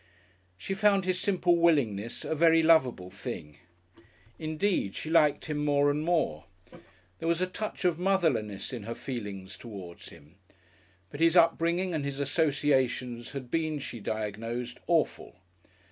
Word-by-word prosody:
She 100 - -4
found 200 -1 +3
his 185 -1 0
simple 180 -3 +2
willingness 120 -10 +1
a - - -1
very 165 +1 +4
lovable 130 - +3
thing. 75 0 -7 0.8
Indeed 155 - -1
she 160 - -5
liked 155 -3 +3
him 150 -2 -2
more 145 0 +3
and 150 +1 -1
more. 155 - 0 0.7
There - - -3
was 170 0 +2
a 185 - +2
touch 190 +1 -5
of 175 -2 +2
motherliness 155 - 0
in 120 - -4
her 115 +3 -6
feelings 100 -7 -6
towards 95 -7 -9
him. 80 +2 -17 0.7
But 145 - -8
his 165 +2 +4
upbringing 170 +2 +3
and 155 -3 -1
his 140 0 -4
associations 135 -5 0
had 130 -3 -7
been, 160 -2 0
she 125 -4 -6
diagnosed, 115 +4 -4
"awful." 165 -2 0
145 Hz, 145 wpm, -29 LUFS, 115-170 Hz, 0.8 s, very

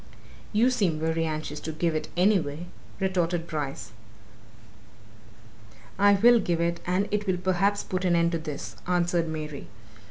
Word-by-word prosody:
"You 230 +4 +3
seem 195 -10 +1
very 160 +1 0
anxious 155 -1 -4
to 160 - -5
give 165 +1 0
it, 155 - -2
anyway," 175 -5 +2 0.3
retorted 175 -3 0
Bryce. 140 -9 -5 2.1
"I 205 0 +6
will 235 +4 +6
give 175 -5 0
it, 170 0 0
and 185 +3 +1
it 210 0 -1
will 185 -1 +1
perhaps 190 +3 +1
put 185 0 -3
an 180 -2 +3
end 170 0 +3
to 165 - -1
this," 150 -3 -6
answered 175 -1 +1
Mary. 155 -2 -5
175 Hz, 150 wpm, -27 LUFS, 160-190 Hz, 2.1 s, I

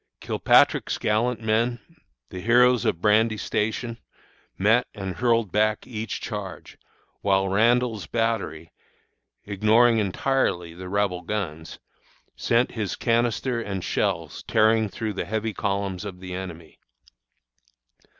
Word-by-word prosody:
Kilpatrick's - - +3
gallant 115 +2 0
men 115 +2 +1 0.5
the 90 - -7
heroes 120 +2 +4
of 85 - 0
Brandy 110 +1 +3
Station 115 +3 -2 0.6
met 110 +6 +3
and 95 -3 -5
hurled 115 -5 +1
back 110 +2 +1
each 110 -3 -5
charge, - - -7 0.4
while 95 -1 +2
Randall's 115 +2 +2
battery, 110 -9 -2 0.7
ignoring 110 +3 +3
entirely 95 -4 0
the 90 +1 -9
Rebel 100 -2 0
guns, 85 -7 -5 0.6
sent 120 +2 +1
his 105 -5 -3
canister 120 +1 0
and 95 -4 -4
shells 85 -7 -2
tearing 110 -1 +3
through 110 +1 -4
the - - -3
heavy 110 +1 -2
columns 100 -2 -2
of 95 -3 -7
the 90 -1 -7
enemy. 85 -4 -8
105 Hz, 115 wpm, -24 LUFS, 95-115 Hz, 0.7 s, heroes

